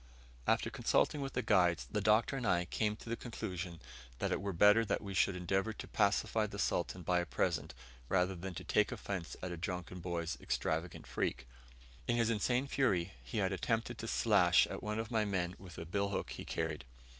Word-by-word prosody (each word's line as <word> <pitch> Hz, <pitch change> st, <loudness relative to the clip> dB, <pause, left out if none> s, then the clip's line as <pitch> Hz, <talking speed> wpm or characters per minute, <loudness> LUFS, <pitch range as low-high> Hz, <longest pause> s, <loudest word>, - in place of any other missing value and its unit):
After -, -, +2 dB
consulting 150 Hz, -, +2 dB
with 135 Hz, -1 st, -4 dB
the 125 Hz, -, -1 dB
guides, 90 Hz, -6 st, +3 dB
the 105 Hz, -, 0 dB
Doctor 110 Hz, +6 st, +3 dB
and 130 Hz, -, -3 dB
I 90 Hz, -1 st, +3 dB
came 105 Hz, +3 st, 0 dB
to 110 Hz, -, -14 dB
the 115 Hz, -, -1 dB
conclusion 90 Hz, -8 st, -5 dB, 0.4 s
that -, -, -1 dB
it -, -, 0 dB
were 100 Hz, 0 st, -2 dB
better 105 Hz, +5 st, +6 dB
that 110 Hz, -, -1 dB
we 100 Hz, -1 st, -5 dB
should 90 Hz, +1 st, +3 dB
endeavour 95 Hz, +4 st, 0 dB
to -, -, -8 dB
pacify 105 Hz, +1 st, +2 dB
the 100 Hz, -, -7 dB
Sultan 90 Hz, -2 st, -1 dB
by 90 Hz, +2 st, +2 dB
a 85 Hz, -, -1 dB
present, 80 Hz, -4 st, -1 dB, 0.3 s
rather 90 Hz, 0 st, +2 dB
than 90 Hz, +1 st, -6 dB
take -, -, +1 dB
offence 90 Hz, -5 st, -4 dB
at 90 Hz, -, -3 dB
a 85 Hz, -, -4 dB
drunken 90 Hz, +1 st, -4 dB
boy's 85 Hz, -1 st, -3 dB
extravagant 80 Hz, +2 st, -2 dB
freak. 65 Hz, -, -2 dB, 0.6 s
In 120 Hz, -, +2 dB
his 115 Hz, -1 st, +3 dB
insane 120 Hz, +4 st, +1 dB
fury 95 Hz, -11 st, +1 dB
he -, -, -6 dB
had 95 Hz, -2 st, +2 dB
attempted 115 Hz, +4 st, -1 dB
to 115 Hz, -, -4 dB
slash 95 Hz, -7 st, +5 dB
at -, -, -6 dB
one 105 Hz, 0 st, -2 dB
of 110 Hz, +1 st, -3 dB
my 110 Hz, -2 st, +2 dB
men 90 Hz, -4 st, -1 dB
with 90 Hz, -3 st, -11 dB
a 85 Hz, -, -5 dB
billhook 100 Hz, +3 st, -1 dB
he -, -, -6 dB
carried. 80 Hz, -2 st, -2 dB
95 Hz, 200 wpm, -35 LUFS, 90-110 Hz, 0.6 s, better